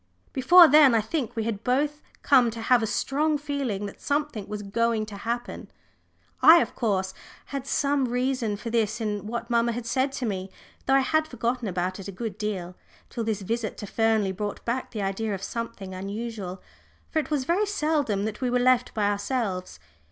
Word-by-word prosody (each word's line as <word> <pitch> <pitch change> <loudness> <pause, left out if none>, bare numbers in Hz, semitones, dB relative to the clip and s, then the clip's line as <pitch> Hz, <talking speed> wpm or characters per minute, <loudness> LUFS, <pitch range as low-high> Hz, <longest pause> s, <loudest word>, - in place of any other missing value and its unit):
Before 340 +7 +8
then 285 -4 +7
I 225 - +4
think 245 +2 -3
we 225 - -1
had 220 -2 -3
both 290 +4 0 0.2
come 255 -4 +5
to 230 0 -7
have 245 0 +4
a 220 - 0
strong 295 +7 0
feeling 280 -9 -3
that 200 - -9
something 285 -8 -2
was 210 0 -5
going 225 +2 0
to 215 -1 -9
happen. 235 +4 -4 0.7
I, 325 +2 +9
of - - -1
course, 190 -5 -1 0.4
had 275 -1 -4
some 280 -1 +1
reason 245 -3 -1
for 230 +2 -6
this 225 -1 0
in 210 -2 -3
what 235 +1 -4
mamma 235 0 +2
had 240 0 -5
said 260 +3 0
to 270 -2 -3
me, 190 -3 -3 0.4
though 270 - +4
I 270 - +5
had 315 +4 +1
forgotten 240 -4 -2
about 185 +1 -2
it 195 - -7
a - - -5
good 220 +3 -6
deal, 185 -5 -3 0.4
till 235 - -3
this 220 -2 -2
visit 225 +2 -3
to - - -6
Fernley 220 -2 +1
brought 205 +2 -5
back 245 +2 -2
the 210 -3 -4
idea 200 +2 -2
of 195 - -8
something 230 -4 -5
unusual. 195 -1 -5 0.5
For 320 - +1
it 310 - -4
was 295 -4 0
very 375 +8 +1
seldom 300 - 0
that 215 +2 -5
we 250 - +1
were 250 - +2
left 250 0 +2
by 210 -2 +1
ourselves. 205 -3 -2
230 Hz, 195 wpm, -26 LUFS, 205-265 Hz, 0.7 s, I